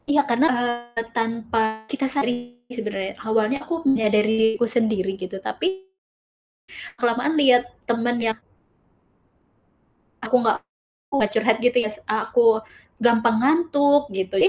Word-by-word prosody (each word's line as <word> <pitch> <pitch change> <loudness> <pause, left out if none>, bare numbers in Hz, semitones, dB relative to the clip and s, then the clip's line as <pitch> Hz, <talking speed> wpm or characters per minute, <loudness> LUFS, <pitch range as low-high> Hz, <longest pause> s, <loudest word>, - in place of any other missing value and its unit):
Iya, 290 0 +4
karena, 240 +5 +3
eee, 240 -1 -2
tanpa 225 -1 -2
kita 275 +4 -3
sadari 245 -3 -2 0.2
sebenarnya. 205 -3 -4
Awalnya 220 +4 0
aku 330 -1 -4
menyadari 220 -5 +3 0.3
diriku 235 - +2
sendiri 220 -5 0
gitu, 185 +1 -6
tapi 380 +1 -3 1.1
kelamaan 245 +6 0
lihat 250 -4 +4 0.2
teman 235 +1 0
yang 225 -1 -1 1.8
Aku - - 0 0.6
enggak 215 -7 -2
curhat 225 +1 +2
gitu 245 +1 +1
ya, 230 -3 +2
se 210 - -10
eee, 215 0 0
aku 225 -2 +3 0.3
gampang 235 -1 +3
ngantuk 290 -1 +3
gitu 190 0 -1
ya, - - +6
235 Hz, 125 wpm, -22 LUFS, 220-255 Hz, 1.8 s, ya